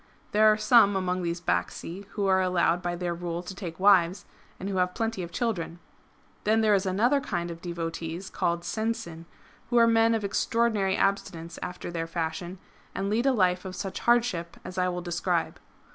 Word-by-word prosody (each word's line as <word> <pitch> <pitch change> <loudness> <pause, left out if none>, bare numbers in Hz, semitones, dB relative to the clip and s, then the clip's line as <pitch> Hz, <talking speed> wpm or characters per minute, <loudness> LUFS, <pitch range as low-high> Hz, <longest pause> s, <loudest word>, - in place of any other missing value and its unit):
There 215 +1 +6
are 215 - +2
some 215 -2 +5
among 185 -1 -1
these 170 0 -2
Bacsi 165 - -2
who 205 - -1
are 190 -1 +4
allowed 180 -1 +2
by 175 -1 -2
their 175 0 -2
rule 170 0 -4
to 190 - -7
take 180 -4 -7
wives, 190 -2 +4 0.3
and 190 - -5
who 195 -1 -2
have 180 0 +1
plenty 225 -3 -2
of 170 - -5
children. 215 -6 -2 0.7
^"^ - - -35
Then 220 +1 +3
there 215 -1 +4
is 195 -1 +2
another 240 +10 +2
kind 175 -10 -3
of 165 0 -9
devotees 170 +1 -4
called 170 0 -1
Sensin, 175 -6 -3 0.4
who 240 - +2
are 230 - +7
men 230 0 +4
of 220 - -2
extraordinary 205 -1 +1
abstinence 170 -4 -1
after 180 -1 -6
their 165 -1 -3
fashion, 170 +2 -4 0.4
and 195 +1 -2
lead 235 +5 +1
a - - +5
life 185 -6 +2
of 185 -1 -6
such 190 0 -4
hardship 235 -9 +1
as 180 - -7
I 180 0 +2
will 180 -1 -4
describe. 175 -1 -1
185 Hz, 190 wpm, -27 LUFS, 170-215 Hz, 0.7 s, are